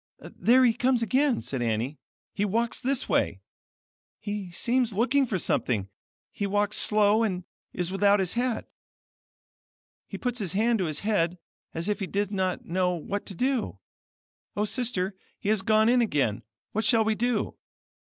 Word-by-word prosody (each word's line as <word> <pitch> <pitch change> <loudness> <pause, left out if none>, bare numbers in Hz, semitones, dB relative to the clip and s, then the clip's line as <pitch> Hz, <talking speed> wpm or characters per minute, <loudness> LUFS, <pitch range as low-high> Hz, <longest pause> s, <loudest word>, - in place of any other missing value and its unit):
"There 255 +3 +5
he 235 - +4
comes 250 0 +1
again," 260 +3 +2
said 135 -3 -3
Annie. 120 +5 -1 0.3
"He 205 - -1
walks 225 +4 0
this 265 +1 -1
way. - - +1 0.8
He 205 -3 -5
seems 240 +5 0
looking 260 +6 +2
for 210 - -1
something. 110 - 0 0.4
He 200 - -3
walks 205 +1 +1
slow, 210 +1 +4
and 185 -5 -1 0.3
is 180 0 -3
without 200 +1 +3
his 185 -2 0
hat. 245 -1 -1 1.4
He - - -6
puts 245 -1 -3
his 190 -4 -3
hand 225 +3 +2
to 185 - +1
his 155 -2 -3
head, 180 -5 +1 0.4
as 165 +3 -2
if 210 0 0
he 195 - -3
did 200 +1 -1
not 190 -2 -1
know 180 +1 0
what 200 +5 -4
to 195 - -7
do. 255 +3 -1 0.8
Oh, 210 - +2
sister, 215 -5 -1 0.2
he 200 - -3
has 215 -2 +3
gone 215 +2 +3
in 245 +1 +4
again; 135 - 0 0.3
what 220 - -1
shall 225 +1 +4
we 220 0 +1
do?" 235 0 -1
210 Hz, 165 wpm, -27 LUFS, 185-235 Hz, 1.4 s, There